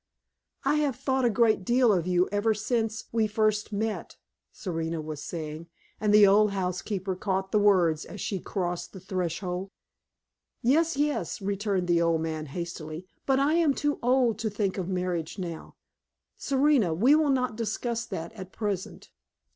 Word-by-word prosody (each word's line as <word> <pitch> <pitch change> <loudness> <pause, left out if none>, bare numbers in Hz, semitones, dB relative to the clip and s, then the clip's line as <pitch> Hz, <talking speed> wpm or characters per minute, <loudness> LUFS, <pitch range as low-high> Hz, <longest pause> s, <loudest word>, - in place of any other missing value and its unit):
"I 290 +2 +3
have 290 -4 +1
thought 265 -1 0
a - - +5
great 220 -2 +3
deal 240 +1 +4
of 175 -2 0
you 180 0 +3
ever 210 +2 +1
since 220 0 -1
we 225 -1 +2
first 215 0 0
met," 215 +1 -3 0.3
Serena 165 -3 -3
was 155 -1 -6
saying, 160 0 -6 0.3
and 210 0 +1
the 210 0 +8
old 205 +1 +5
housekeeper 190 +1 -2
caught 190 0 -2
the 210 - +3
words 180 -6 +3
as 205 - -10
she 195 +1 -2
crossed 175 -2 -3
the 190 - -8
threshold. 180 0 -3 0.9
"Yes, 310 +5 +3
yes," 295 -3 -1
returned 200 -2 -1
the 170 -1 +3
old 165 -1 +2
man, 155 -1 -3
hastily, 165 +1 -6 0.2
"but 270 -1 +3
I 285 +3 +3
am 325 -5 +3
too 290 0 -1
old 245 -3 +2
to 220 -1 -1
think 200 -2 -1
of 185 -1 -3
marriage 180 -2 -2
now. 170 -4 -6 0.6
Serena, 270 - +2
we 240 - +5
will 310 -1 +4
not 255 -4 +1
discuss 230 +1 -2
that 170 0 -5
at 190 -4 -9
present." 205 -4 -4
200 Hz, 165 wpm, -27 LUFS, 180-235 Hz, 0.9 s, the